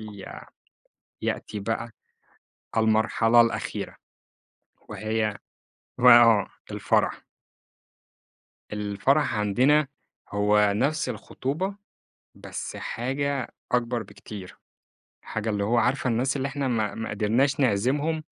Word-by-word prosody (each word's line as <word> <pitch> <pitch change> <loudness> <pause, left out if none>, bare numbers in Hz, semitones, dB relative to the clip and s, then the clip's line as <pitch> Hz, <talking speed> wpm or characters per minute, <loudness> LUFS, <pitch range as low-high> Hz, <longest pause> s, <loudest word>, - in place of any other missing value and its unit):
ي 105 -3 -9 1.0
يأتي 105 - -3
بقى، 115 +3 -3 0.9
المرحلة 110 +1 +4
الأخيرة، 115 -1 -1 0.9
وهي 110 -1 -2 0.6
ما 120 -1 +9
آه، 110 -4 +4 0.2
الفرح. - - +1 1.5
الفرح 105 +7 +1
عندنا، 130 +8 +3 0.4
هو 105 0 +3
نفْس 145 +9 0
الخطوبة 175 +10 -3 0.6
بس - - -7
حاجة 135 +2 -3 0.2
أكبر 120 -1 +1
بكتير، 100 -1 -11 0.6
حاجة 110 +1 -3
اللي 100 -1 -1
هو 120 +3 +2
عارفة 125 +2 +1
الناس 130 +5 0
اللي 135 0 -1
إحنا 140 -1 -2
ما 110 -4 0
ما 110 - -4
قدرناش 115 +7 +1
نعزمهم؟ 140 +8 +1
115 Hz, 95 wpm, -26 LUFS, 105-135 Hz, 1.5 s, ما